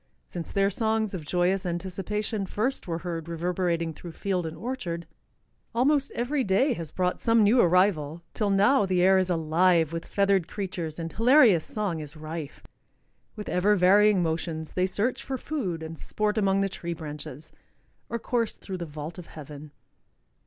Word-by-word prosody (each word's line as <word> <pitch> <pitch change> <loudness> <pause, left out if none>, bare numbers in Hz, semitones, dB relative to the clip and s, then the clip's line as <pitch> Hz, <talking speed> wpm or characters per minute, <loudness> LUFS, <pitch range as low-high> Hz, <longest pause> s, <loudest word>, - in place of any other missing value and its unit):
Since 170 -2 -6
their 195 0 +2
songs 220 0 0
of 160 -5 -6
joyous 180 +2 +1
anticipation 195 +4 -3
first 235 +6 -2
were 165 -1 -2
heard 170 -2 -5
reverberating 170 -1 -1
through 170 +2 -10
field 180 -3 -2
and 160 0 -7
orchard, 175 -6 -4 0.7
almost 275 +3 +3
every 260 +4 0
day 245 +8 +2
has 165 -8 -6
brought 180 +3 -1
some 230 -1 +4
new 230 +4 +5
arrival, 170 -3 +2
till 210 -2 0
now 200 +3 +4
the 180 -1 +2
air 190 0 +6
is 185 -1 0
alive 165 0 +2
with 165 0 -5
feathered 195 -4 +2
creatures 175 -6 -4
and 165 -1 -5
hilarious 230 - +5
song 200 -6 -2
is 150 0 -6
rife. 155 -1 -7 0.7
With 210 -2 -7
ever 200 +4 +3
varying 200 +1 +5
motions 160 -1 -3
they 185 0 +1
search 210 +6 -1
for 265 -1 -3
food 200 - -3
and 160 0 -7
sport 210 0 -1
among 195 -2 +2
the 195 - +2
tree 170 -2 -5
branches, 150 -1 -8 0.6
or 235 - -2
course 235 0 -1
through 190 -2 -7
the 175 - -5
vault 155 +3 -7
of 175 - -10
heaven. 150 0 -10
185 Hz, 165 wpm, -27 LUFS, 165-210 Hz, 0.7 s, air